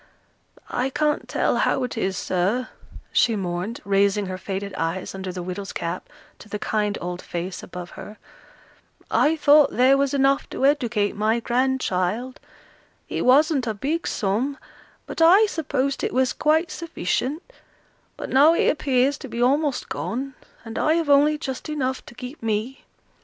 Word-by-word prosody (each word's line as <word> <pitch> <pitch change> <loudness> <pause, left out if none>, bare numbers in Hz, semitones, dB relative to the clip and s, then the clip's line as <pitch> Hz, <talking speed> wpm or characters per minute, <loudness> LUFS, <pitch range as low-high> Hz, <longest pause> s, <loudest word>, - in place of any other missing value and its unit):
"I 255 +2 0
can't 300 +2 -1
tell - - +1
how 265 - +1
it 250 - -4
is, 190 -4 -1
sir," 195 +8 -1 0.4
she 230 - +3
mourned, 185 +3 -3
raising 200 +1 +2
her 185 0 -5
faded 195 +1 -5
eyes 170 +3 -3
under 190 -1 -5
the 180 -1 -6
widow's 185 +2 -5
cap 170 +2 -4 0.3
to 215 - -14
the 210 - -3
kind 210 -1 -1
old 180 0 -5
face 175 +2 -5
above 180 -1 -8
her, 210 - -10 0.9
"I 310 +2 +3
thought 295 -1 +5
there 265 +2 +5
was 280 0 +1
enough 275 0 +2
to 270 - -1
educate 240 -8 +1
my 220 +3 +1
grandchild; 245 -2 -1 0.7
it - - -2
wasn't 275 0 +4
a 220 - -1
big 305 +10 -2
sum, 225 +8 -1 0.5
but - - -5
I 370 +7 +7
supposed 280 -7 -2
it - - -2
was 260 -1 +2
quite 315 +2 +1
sufficient; 305 - -2 0.7
but - - -6
now 295 +5 +6
it - - +3
appears 275 -1 +1
to 275 - -8
be 235 -1 -6
almost 280 +3 +1
gone, 270 +3 -4 0.3
and 225 0 -5
I 310 - +3
have 330 -4 +1
only 295 +2 +5
just 270 0 -5
enough 260 -4 -2
to 240 - -12
keep 250 +4 -9
me." 225 +4 -3
250 Hz, 160 wpm, -23 LUFS, 200-285 Hz, 0.9 s, I